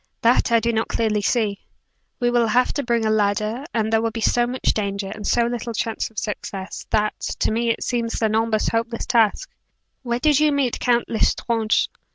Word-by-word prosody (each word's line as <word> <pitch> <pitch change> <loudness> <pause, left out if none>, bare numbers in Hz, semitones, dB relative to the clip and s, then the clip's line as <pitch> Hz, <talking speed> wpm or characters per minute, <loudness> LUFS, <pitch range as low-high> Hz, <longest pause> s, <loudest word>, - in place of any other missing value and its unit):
"That 235 +1 +3
I 230 - +5
do 235 +1 0
not 220 0 0
clearly 215 -2 0
see. 205 -2 0 0.6
We 240 0 +1
will 240 -1 +3
have 250 +3 +2
to 285 - -1
bring 235 -3 0
a 215 - +2
ladder, 215 +4 0
and 220 -1 -1
there 225 - +4
will 230 - 0
be 225 +1 -6
so 240 +2 +2
much 255 +1 0
danger, 200 -2 -3
and 210 -1 -6
so 240 - +3
little 235 -1 -4
chance 225 0 -2
of 225 - -26
success, 195 -2 -5
that, 210 -1 0 0.2
to - - 0
me 230 +1 0
it 230 - -1
seems 235 -2 -2
an 215 -1 +2
almost 220 -1 +1
hopeless 230 0 -2
task. 235 - +2 0.5
Where 235 -2 -1
did 295 +2 +3
you 305 0 +4
meet 275 -4 0
Count 240 -1 +2
L'Estrange?" 225 0 +1
230 Hz, 205 wpm, -22 LUFS, 215-240 Hz, 0.6 s, I